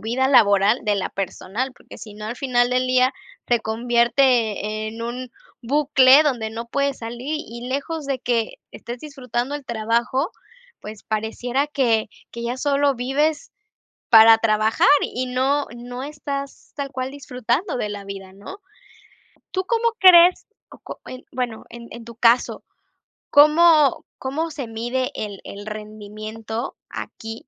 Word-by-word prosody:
vida 240 +4 0
laboral, 205 -2 +4
de 210 -1 +1
la 195 - -3
personal, 200 +6 -4
porque - - -14
si 210 -3 -10
no 210 0 -9
al 225 - -4
final 245 -3 +1
del 255 0 +1
día, 255 0 +3 0.3
te 240 -2 +1
convierte 230 -2 +1
en 225 +1 -9
un 245 +1 -5 0.3
bucle 275 +1 +5
donde 245 -7 -1
no 230 +1 -6
puedes 280 +2 -1
salir, 240 +6 -5
y 240 -3 -8
lejos 285 +3 -3
de 270 -2 -1
que 235 -2 -1 0.2
estés 240 +1 -8
disfrutando 265 -2 -4
el 290 - -6
trabajo, 235 - -1 0.5
pues, 210 -1 -10
pareciera 240 +5 -2
que 240 -8 +1 0.2
que 235 - -7
ya 240 +2 -3
sólo 280 0 +1
vives 295 - -1 0.6
para 225 0 +8
trabajar, 220 +1 +2
y 255 +1 -3
no 265 +3 0
no 245 +1 -7
estás 280 -1 -6
tal 280 -1 -4
cual 260 0 -4
disfrutando 255 - -2
de 215 - -2
la 205 -1 -7
vida, 195 -1 -9
¿no? 200 - -11 0.9
¿Tú 375 - -1
cómo 465 +2 +1
crees? 360 -1 +7 0.2
O - - -14
có - - -10
eh, 255 0 -9
bueno, 245 -3 -4
en 235 0 -11
en 235 0 -10
tu 235 - -11
caso, 235 +1 +2 0.7
¿cómo 305 -1 +5
cómo 310 +5 -3
se 275 -5 -6
mide 240 +3 -3
el 205 -3 -5
el 200 +1 -9
rendimiento 215 +2 -7
aquí, 225 +3 -8
245 Hz, 150 wpm, -22 LUFS, 225-275 Hz, 0.9 s, para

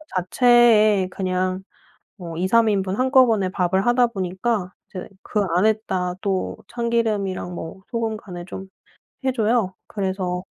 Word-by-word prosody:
자체에 215 0 +4
그냥 185 0 -2 0.5
뭐 170 -4 -7
2-3 220 +6 +3
인분 195 -1 -1
한꺼번에 255 -6 +4
밥을 190 +1 0
하다 245 0 +4
보니까 190 -1 -2 0.2
이제 185 - -7 0.2
그 210 - -2 0.2
안에다 190 -3 +1
또 195 -2 -2
참기름이랑 215 -6 -1
뭐 165 +3 -8
소금 225 -2 -2
간을 175 -4 -9
좀 190 +1 -8 0.6
해 265 - +2
줘요. 225 -4 +1
그래서 190 -3 -3
195 Hz, 245 characters per minute, -22 LUFS, 185-230 Hz, 0.6 s, 자체에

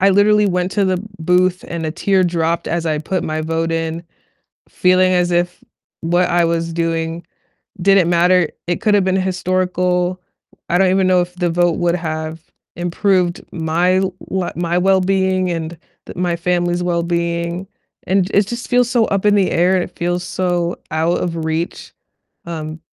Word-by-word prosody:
I 195 +1 +5
literally 210 +1 +4
went 180 0 -1
to 205 - +1
the 185 -1 +1 0.2
booth 180 +2 +2
and 165 -1 -4
a - - -2
tear 190 +1 +2
dropped 170 -1 0
as 170 -1 -1
I 155 -1 0
put 180 +4 -2
my 155 0 -2
vote 165 +1 -1
in, 165 0 -2 0.7
feeling 185 0 +3
as 180 -1 +2
if 175 0 -1 0.4
what 175 +2 +1
I 175 0 +3
was 165 0 -1
doing 165 0 -2 0.6
didn't 195 -2 +4
matter, 175 0 +4 0.2
it 175 - -1
could've 205 -3 +3
been 190 0 +1
historical, 180 -1 0 0.5
I 175 - +3
don't 190 0 +3
even 190 0 +2
know 185 -1 +4
if 175 0 -5
the 175 -1 0
vote 175 0 +2
would 175 0 +1
have 160 -1 -4 0.4
improved 175 0 0
my 170 +3 +1 0.4
l 185 -2 -1
my 175 0 -1
wellbeing 190 0 +2
and 165 0 -4 0.3
the - - -9
my 175 -1 0
family's 175 0 0
wellbeing. 170 +1 -1 0.4
And 190 0 +2
it 200 -1 +3
just 240 +2 -5
feels 245 -1 +3
so 240 -3 +3
up 200 -1 -1
in 205 0 +5
the 195 -2 +2
air, 180 +2 +3
it - - -7
feels 175 +1 -1
so 175 -1 -1
out 160 +2 +1
of 165 -2 -3
reach, 160 +2 -3 0.5
um, 160 -1 -6
175 Hz, 170 wpm, -18 LUFS, 170-185 Hz, 0.7 s, I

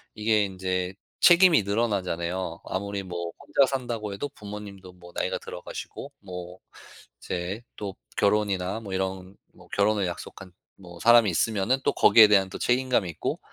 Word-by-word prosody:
이게 105 -1 +2
인제 95 -1 -3 0.3
책임이 175 - +6
늘어나잖아요. 95 -5 -2
아무리 100 +1 -3
뭐 85 -2 -5
혼자 140 - +3
산다고 120 -6 -3
해도 145 +9 -4
부모님도 100 -6 -10
뭐 90 -1 -15
나이가 - - -1
들어 - - -8
가시고 - - -8
뭐 90 -2 -9 0.6
이제 90 +5 -4
또 100 -2 -5 0.2
결혼이나 100 -1 +1
뭐 100 -4 -8
이런 95 0 -3 0.2
뭐 - - -18
결혼을 100 -1 +1
약속한 90 +1 -8 0.2
뭐 90 -3 -13
사람이 115 -2 +6
있으면은 110 +7 +1
또 - - +3
거기에 110 -2 +7
대한 100 -2 +4
또 95 - -7
책임감이 125 -5 +1
있고 80 - -3
100 Hz, 335 characters per minute, -26 LUFS, 90-110 Hz, 0.6 s, 거기에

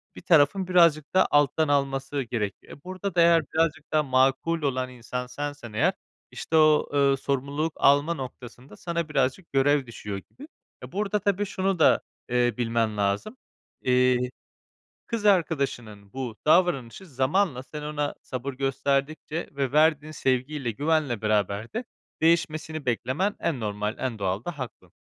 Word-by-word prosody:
bir - - -10
tarafın 175 +3 +3
birazcık 170 -5 +4
daha 190 0 +4
alttan 145 +2 +3
alması 135 0 0
gerekiyor. 110 -4 -4
E, 140 - -27
burada 185 0 -5
da 170 - +5
eğer 170 -1 +6
birazcık 160 -1 0
daha 155 -1 +3
makul 135 +5 +2
olan 130 -3 -1
insan 125 0 -6
sensen 145 -4 -6
eğer, 110 - +2 0.4
işte 160 - -4
o, 155 -1 +4
eee, 140 -1 +3
sorumluluk 140 +4 -2
alma 145 +4 +4
noktasında 125 -4 -9
sana 170 -2 -3
birazcık 140 +5 -1
görev 135 -1 +3
düşüyor 105 -4 -6
gibi. 290 +4 -13 0.4
E, - - -9
burada 210 +1 -1
tabii 200 0 0
şunu 190 -2 -1
da, - - +5 0.3
eee, 120 0 +2
bilmen 115 -3 0
lazım. 100 - -1 0.4
Eee, 125 0 +3 0.9
kız 230 -3 -3
arkadaşının 135 - 0
bu 125 -4 -5
davranışı 155 -2 +2
zamanla 135 0 0
sen 150 +2 -8
ona 150 -1 -2
sabır 130 +2 -5
gösterdikçe 140 +4 -2
ve 140 -2 -2
verdiğin 155 0 +3
sevgiyle 130 -2 -1
güvenle 145 -3 0
beraber 105 0 0
de 235 +3 -2 0.4
değişmesini 155 -2 +1
beklemen 130 - -1
en 145 -7 -1
normal, 105 0 -3
en 120 -5 -3
doğal 95 +2 -1
da 175 -4 -5
hakkın. 130 - -8
140 Hz, 145 wpm, -26 LUFS, 125-160 Hz, 0.9 s, eğer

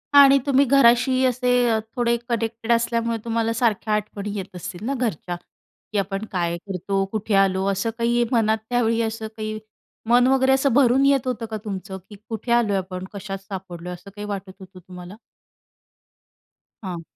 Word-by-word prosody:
आणि 275 -1 +9
तुम्ही 280 0 +4
घराशी 255 0 +4
असे 250 0 0 0.2
अ, 220 - +2 0.2
थोडे 240 -1 +2
कनेक्टेड 230 0 -2
असल्यामुळे 230 0 +1
तुम्हाला 230 0 0
सारख्या 225 -2 0
आठवणी 210 -1 -3
येत 190 -1 -7
असतील 180 +4 -7
ना 275 - -1
घरच्या? 180 -6 -2 0.6
की 210 - -2
आपण 195 +2 -2
काय 170 -2 -1
करतो? 195 +1 -2
कुठे 215 -1 -2
आलो? 190 -1 +3
असं 195 +4 -1
काही 235 +1 +2
मनात 220 -3 +3
त्यावेळी 230 -2 +1
असं 220 0 -3
काही 215 0 -4 0.5
मन 245 +1 +5
वगैरे, 265 0 +3
असं 270 -1 +2
भरून 265 +1 +4
येत 275 -2 +3
होतं 240 -2 -2
का 220 - -2
तुमचं? 190 -1 -5
की 210 - -10
कुठे 225 +1 -4
आलोय 225 -4 +3
आपण? 185 0 -5
कशात 195 -1 -5
सापडलोय? 180 -3 -7
असं 180 +3 -11
काही 210 0 -6
वाटत 195 -2 -5
होतं 185 -1 -13
तुम्हाला? 180 +2 -11 1.7
हां. 180 -3 -5
220 Hz, 165 wpm, -23 LUFS, 195-240 Hz, 1.7 s, आणि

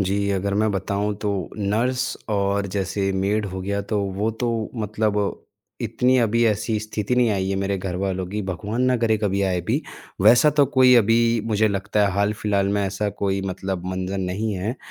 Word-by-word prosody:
जी, 100 +1 0
अगर 100 +1 -1
मैं 110 +1 +2
बताऊँ 100 +2 -1
तो 105 - 0 0.3
नर्स 120 +5 0
और 100 0 0
जैसे 95 0 -1
मेड 100 +2 0
हो 95 0 -5
गया 100 +2 -2
तो 105 - +2 0.2
वो 110 +2 +1
तो 120 - +1 0.2
मतलब 105 -2 -1 0.4
इतनी 130 +1 +2
अभी 115 0 +2
ऐसी 110 +1 0
स्थिति 110 +2 -2
नहीं 120 -2 +4
आई 95 -2 -1
है 95 - 0
मेरे 100 0 -1
घर 90 -1 -4
वालों 95 -1 -2
की, 105 +2 -3
भगवान 100 +6 -3
ना 130 -1 +3
करे 110 -2 +2
कभी 100 -2 0
आए 90 -2 0
भी, 85 - -1 0.4
वैसा 120 +9 +6
तो 145 -1 +3
कोई 130 -1 +7
अभी 115 +1 +4 0.3
मुझे 110 0 +2
लगता 100 +1 -1
है - - 0
हाल-फिलहाल 100 0 0
में - - +1
ऐसा 100 +2 -2
कोई 95 0 +1
मतलब 95 -1 -4
मंज़र 95 +1 -3
नहीं 95 +4 -2
है। 105 +7 -3
100 Hz, 190 wpm, -23 LUFS, 95-110 Hz, 0.4 s, कोई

